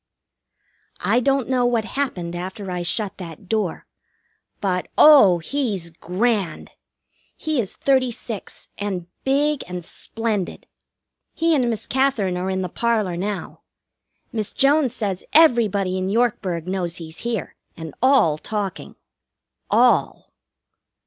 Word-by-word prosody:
I - - +3
don't 270 0 +1
know 255 -1 +1
what 240 -3 +1
happened 185 -11 -3
after 190 +2 -5
I 180 -1 -2
shut 200 +3 0
that 170 +1 -9
door. 210 -4 -1 0.7
But, 180 -2 -1
oh, 270 - +8
he's 195 - -2
grand! 190 +1 -1 0.7
He 310 -4 -1
is 195 - -6
thirty 260 -2 +2
six, 225 -3 -7
and 195 -4 -3 0.2
big 290 +2 +1
and 180 -1 -6
splendid. 220 -3 -3 0.7
He 330 0 +2
and 255 -5 +2
Miss 225 -2 -3
Katherine 260 -8 +1
are 180 +1 -2
in 190 0 -1
the - - -2
parlor 215 -2 0
now. 195 +2 -4 0.7
Miss 215 -3 -2
Jones 275 -2 +3
says 195 -6 -2
everybody 215 - +4
in 185 +1 -2
Yorkburg 195 -7 0
knows 180 -2 -2
he's 160 -1 -8
here, 230 -4 -3 0.2
and 160 -3 -7
all 255 - +4
talking. 205 -1 -4 0.7
All! - - +2
205 Hz, 125 wpm, -22 LUFS, 180-245 Hz, 0.7 s, oh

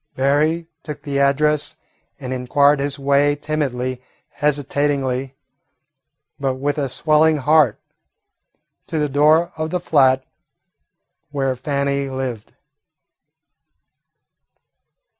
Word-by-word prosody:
Berry 150 +5 +1
took 150 -3 -8
the 140 -2 -2
address 145 +2 +1 0.4
and 130 0 -5
inquired 140 +3 +2
his 140 0 -2
way 140 +1 +2
timidly, 135 -4 -3 0.3
hesitatingly, 140 -2 -1 1.0
but 135 -2 -1
with 145 +3 -2
a 140 -2 -1
swelling 155 +3 +3
heart, 150 -4 +3 1.1
to 160 - -3
the 150 -1 +1
door 155 +4 +3
of 155 0 -2
the 180 - -1
flat 135 -6 +3 1.0
where 135 -2 -1
Fannie 140 +1 -2
lived. 130 -5 -5
140 Hz, 95 wpm, -20 LUFS, 135-150 Hz, 1.1 s, swelling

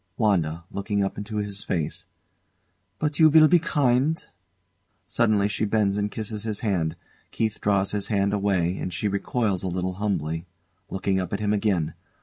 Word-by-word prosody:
WANDA. 85 -7 +1
[Looking 100 0 -1
up 95 - -2
into 105 +1 -5
his 105 -1 -2
face] 80 -4 -3 0.9
But 150 -1 -1
you 160 -1 +8
will 155 0 +7
be 175 +2 +5
kind? 145 -2 +1 0.8
Suddenly 110 -4 +2
she 105 - -2
bends 105 -2 +2
and 105 0 0
kisses 105 0 -4
his 110 -2 -3
hand. 90 -8 0 0.3
KEITH 110 -1 -2
draws 100 -1 +2
his 105 -1 -2
hand 100 -2 +1
away, 95 -3 +1
and 90 - -3
she 105 - -1
recoils 100 0 0
a 95 - -2
little 90 +1 -2
humbly, 85 -4 -1 0.4
looking 95 0 0
up 90 0 -4
at 100 - -1
him 105 0 +1
again. 100 -7 +1
100 Hz, 165 wpm, -25 LUFS, 95-110 Hz, 0.9 s, you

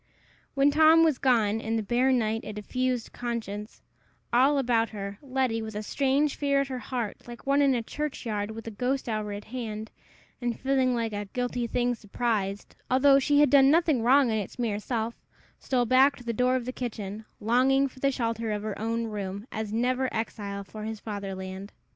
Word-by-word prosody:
When 275 +1 +4
Tom 320 +2 +6
was 310 -5 +2
gone, 225 -4 +2
and 225 +1 -1
the 220 - -1
bare 245 +5 +2
night, 225 -3 +1
a 215 - -6
diffused 250 +3 -2
conscience, 225 -3 -5 0.5
all 270 +4 +5
about 235 -4 +2
her, 200 -1 -6
Letty, 260 -4 -1
with 220 -1 -6
a 210 - -3
strange 280 +5 +1
fear 280 -1 +2
at 275 - -3
her 255 -1 -4
heart, 245 -4 -5
like 240 0 -10
one 280 +1 +3
in 275 -2 +4
a 235 - -1
churchyard, 225 -7 -3
with 225 +1 -8
the 225 - -5
ghost 250 +5 -2
hour 215 -2 -2
at 205 0 -6
hand, 220 -2 -6 0.5
and 240 -1 -2
feeling 260 -1 +2
like 230 -2 -2
"a 205 0 -3
guilty 245 +2 -2
thing 245 +1 0
surprised," 205 -3 -2
although 275 +2 +5
she 290 +1 +3
had 295 - +4
done 275 -1 +7
nothing 315 -5 +3
wrong 255 +1 +4
in 220 - +1
its 200 - -6
mere 225 -4 -1
self, 230 +1 -2 0.5
stole 250 -2 0
back 265 +4 +5
to 245 - -13
the 235 -1 -2
door 250 +3 +2
of 250 -2 -2
the 255 - -3
kitchen, 215 -4 -5
longing 260 +5 +3
for 260 - -15
the 275 - +2
shelter 230 -3 -2
of 210 0 -2
her 215 -2 -4
own 230 +1 -1
room, 205 -1 -5
as 220 -1 -4
never 250 +3 0
exile 205 -3 -4
for 215 +3 -10
his 220 0 -5
fatherland. 195 -2 -6
235 Hz, 195 wpm, -27 LUFS, 215-260 Hz, 0.5 s, done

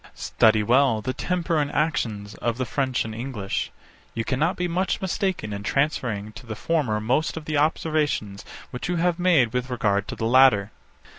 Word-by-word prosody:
Study 110 -1 +3
well 125 0 +3
the 130 - -2
temper 175 -1 -1
and 145 -1 -1
actions 110 -9 -1
of 120 -1 -2
the 130 - -1
French 130 0 -1
and 110 - -6
English: 115 -4 -4 0.4
You 115 0 -2
cannot 150 +7 0
be 180 - -1
much 180 +2 -1
mistaken 190 - -2
in 100 - -5
transferring 115 -5 -1
to 120 +3 -12
the 110 - -5
former 130 -5 0
most 130 +10 0
of 160 - -7
the 155 -1 -1
observations 150 -9 0 0.3
which 125 +7 -5
you 180 - 0
have 175 +1 +1
made 160 -11 +3
with 125 0 -2
regard 105 -4 0
to - - -5
the 115 - -3
latter. 115 -4 +5
130 Hz, 180 wpm, -24 LUFS, 110-155 Hz, 0.4 s, latter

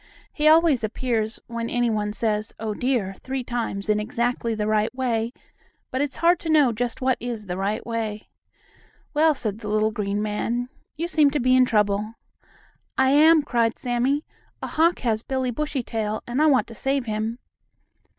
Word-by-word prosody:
He 300 0 +1
always 315 -6 +5
appears 225 0 -1
when 235 0 -4
any 240 -1 +1
one 210 -1 -1
says 215 0 -1
"Oh, 220 -1 -3
dear!" 235 -5 -1
three 265 0 -4
times 230 -5 -3
in 210 0 +2
exactly 235 +1 -1
the 210 -1 -2
right 215 0 +1
way, 235 -3 -1 0.6
but 260 - -1
it's 285 -3 -2
hard 345 +1 +3
to 325 - -5
know 295 -5 +5
just 235 +2 -3
what 260 -1 +2
is 235 -3 -5
the 180 -2 -4
right 195 +3 -2
way. 220 -2 -4 0.9
"Well," 310 0 +4
said 215 -4 -3
the 215 - -7
little 215 +1 +1
green 205 -1 -2
man, 230 +4 -2 0.3
"you 335 +3 -2
seem 305 -4 +4
to 290 +1 -1
be 255 0 +3
in 255 0 +6
trouble." 210 -1 0 0.8
"I 265 0 +4
am," 310 +2 +6
cried 235 -4 0
Sammie. 255 +4 0 0.4
"A - - 0
hawk 335 +3 +2
has 220 -3 0
Billie 260 0 -2
Bushytail, 230 -6 -3
and 245 +4 -1
I 310 - +5
want 275 -4 +4
to - - -9
save 270 +3 -1
him." 220 +1 -2
235 Hz, 180 wpm, -24 LUFS, 215-265 Hz, 0.9 s, in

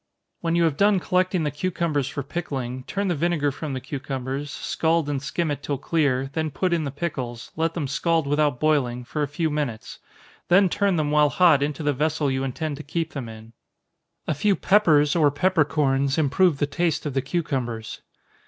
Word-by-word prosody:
When 165 -1 -1
you 170 - +3
have 160 -4 +1
done 200 0 +4
collecting 185 -1 +1
the 150 - -1
cucumbers 155 -4 -1
for 140 0 -4
pickling, 130 -5 -4
turn 200 +1 -2
the 180 - +1
vinegar 155 -2 0
from 145 +1 -5
the 130 - -3
cucumbers, 135 +1 -4
scald 160 +2 0
and 140 -2 -2
skim 160 +2 -2
it 145 -1 -4
till 145 -1 -2
clear, 140 -3 0
then 160 0 -1
put 180 +4 -1
in 165 -3 0
the - - -2
pickles, 130 -6 -5
let 165 +1 -1
them 155 -5 -2
scald 165 +3 +1
without 145 -2 +1
boiling, 135 -6 +1
for 150 +5 -4
a 145 - +1
few 155 +3 -1
minutes; 145 -7 -4 0.5
then 190 +2 +5
turn 200 0 +1
them 150 -2 0
while 150 -1 +4
hot 160 -3 +4
into 145 +1 -2
the 145 0 +2
vessel 150 0 0
you 130 0 -1
intend 145 +3 -3
to 155 - -8
keep 160 +1 -3
them 130 -5 -5
in. 110 +1 -12 0.7
A - - +1
few 195 +8 +2
peppers, 160 -9 +4
or 155 -4 +4
peppercorns, 145 -4 +1
improve 155 +2 +3
the 145 - +1
taste 155 +3 -1
of 145 - -2
the 135 - +1
cucumbers. 130 -7 -3
150 Hz, 195 wpm, -24 LUFS, 135-165 Hz, 0.7 s, then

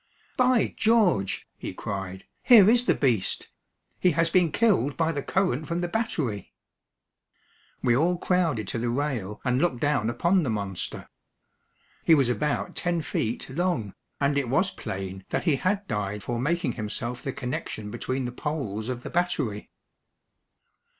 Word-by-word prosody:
"By 250 -1 +3
George," 210 - +2
he - - -6
cried, 95 -2 -5 0.2
"here 225 -6 +8
is 240 +2 +4
the - - +3
beast. 120 -8 0 0.5
He 180 -2 +3
has 165 +1 +2
been 175 -3 +3
killed 145 - +2
by 165 -1 +2
the 145 - -3
current 140 +2 0
from 170 +1 -1
the 175 - -1
battery." 160 - -2 1.3
We 120 -2 +4
all 170 +6 +2
crowded 165 - 0
to 115 - -2
the 120 +1 -1
rail 120 -6 -2
and 125 +1 +2
looked 135 -9 +1
down 140 -6 +1
upon 170 +10 +2
the 140 - -1
monster. 100 -4 -3 1.0
He 165 - +6
was 135 -5 +3
about 120 -5 -1
ten 175 -1 0
feet 115 -4 -2
long, 155 - -1 0.3
and 140 0 +2
it 130 -4 -3
was 185 +9 +2
plain 95 - -6
that - - -1
he 160 -6 +2
had 195 +7 -1
died 105 -1 -3
for 120 -1 -2
making 160 +1 0
himself 120 +2 -4
the 135 - -3
connection 125 -6 -5
between 130 +3 -2
the 125 - -3
poles 125 -6 -3
of 125 -1 -4
the - - -6
battery. 155 -12 -1
135 Hz, 155 wpm, -26 LUFS, 115-175 Hz, 1.3 s, here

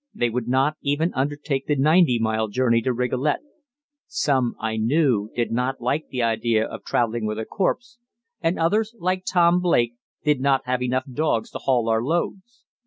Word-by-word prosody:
They 120 -1 0
would 120 0 -3
not 135 +4 +1
even 145 +4 0
undertake 140 0 -2
the 150 - +2
ninety 150 -1 +4
mile 110 -1 0
journey 115 +1 +2
to 130 - 0
Rigolet. 125 +4 0 0.7
Some, 130 -5 0
I 110 0 -2
knew, 115 -3 +2
did 120 -1 -1
not 125 +3 -1
like 140 +6 -1
the 125 -2 -2
idea 115 -1 +1
of 110 -2 -8
travelling 115 -1 0
with 105 0 -3
a 110 - -3
corpse, 240 - -2 0.4
and 165 +1 0
others, 210 +7 +1
like 185 -1 -1
Tom 175 -1 +4
Blake, 120 -10 +2 0.3
did 150 -4 +2
not 135 -1 +2
have 125 0 -1
enough 130 +1 0
dogs 160 - 0
to - - -6
haul 125 -4 +1
our 110 0 +2
loads. 175 - -3
130 Hz, 175 wpm, -23 LUFS, 115-155 Hz, 0.7 s, ninety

